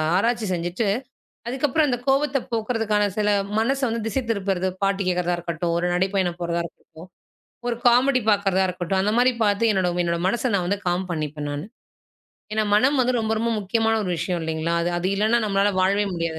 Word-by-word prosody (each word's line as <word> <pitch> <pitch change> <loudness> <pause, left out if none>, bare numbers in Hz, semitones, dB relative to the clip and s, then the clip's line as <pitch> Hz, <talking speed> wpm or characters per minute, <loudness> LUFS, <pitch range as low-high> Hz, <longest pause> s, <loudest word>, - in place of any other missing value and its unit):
ஆராய்ச்சி 230 +3 +1
செஞ்சிட்டு, 175 +5 -2 0.6
அதுக்கப்புறம் 285 +4 +1
அந்தக் 245 -1 -2
கோபத்த 275 0 +2
போக்குறதுக்கான 225 -2 0
சில 210 -1 +2 0.3
மனச 270 +5 +1
வந்து 230 0 -2
திசை 265 +4 -1
திருப்புறது 190 -3 -1 0.2
பாட்டு 195 0 +1
கேக்குறதா 180 -1 +1
இருக்கட்டும், 170 0 -3
ஒரு 175 +1 0
நடைப்பயணம் 185 -1 0
போறதா 170 0 -1
இருக்கட்டும், 165 +1 -13 0.6
ஒரு 235 - -1
காமெடி 255 +2 +4
பாக்குறதா 195 -2 +2
இருக்கட்டும் 180 +1 -1
அந்த 210 +2 +1
மாரி 250 +1 +4
பார்த்து 210 +2 +2
என்னோட 185 -2 +1
என்னோட 170 0 -1
மனச 240 +5 0
நான் 180 -3 +1
வந்து 200 0 -1
காம் 180 +1 -1
பண்ணிப்பேன் 150 -2 -4
நானு. 145 +5 -5 0.9
ஏன்னா 215 0 +1
மனம் 265 +6 +3
வந்து 255 0 +2
ரொம்ப 220 0 -1
ரொம்ப 230 +1 0
முக்கியமான 225 +3 +1
ஒரு 185 - -3
விஷயம் 175 +1 -2
இல்லீங்களா? 160 +1 -2
அது 175 - 0
அது 180 - -2
இல்லன்னா 215 +4 +3
நம்மளால 200 0 +2
வாழ்வே 200 +2 +2
முடியாது 165 -1 -3
200 Hz, 175 wpm, -23 LUFS, 175-230 Hz, 0.9 s, காமெடி